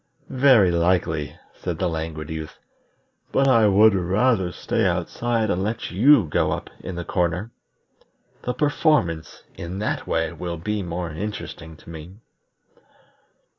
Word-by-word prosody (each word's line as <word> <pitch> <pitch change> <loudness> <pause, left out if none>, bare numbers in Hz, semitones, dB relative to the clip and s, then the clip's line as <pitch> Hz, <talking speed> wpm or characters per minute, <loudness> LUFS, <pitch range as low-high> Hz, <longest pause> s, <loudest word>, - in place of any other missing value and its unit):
"Very 125 -8 +5
likely," 85 -4 0 0.2
said 90 -3 -5
the 90 - 0
Languid 80 -2 -4
Youth; 80 -1 -6 0.7
"but 135 0 +3
I 115 -5 +5
would 105 +2 +6
rather 95 +1 +1
stay - - -1
outside 115 -3 0
and 90 - 0
let 110 +4 -3
you 115 +4 +5
go 75 - 0
up - - -4
in 95 - -7
the 85 0 -5
corner. 90 +4 -1 0.9
The 125 - -3
performance 145 - 0
in 85 +3 -6
that 105 - -2
way 80 -1 0
will 85 0 -5
be 105 +6 -2
more 85 -2 -4
interesting 85 -3 -6
to 85 - -13
me." 80 +3 -10
90 Hz, 135 wpm, -23 LUFS, 85-110 Hz, 0.9 s, would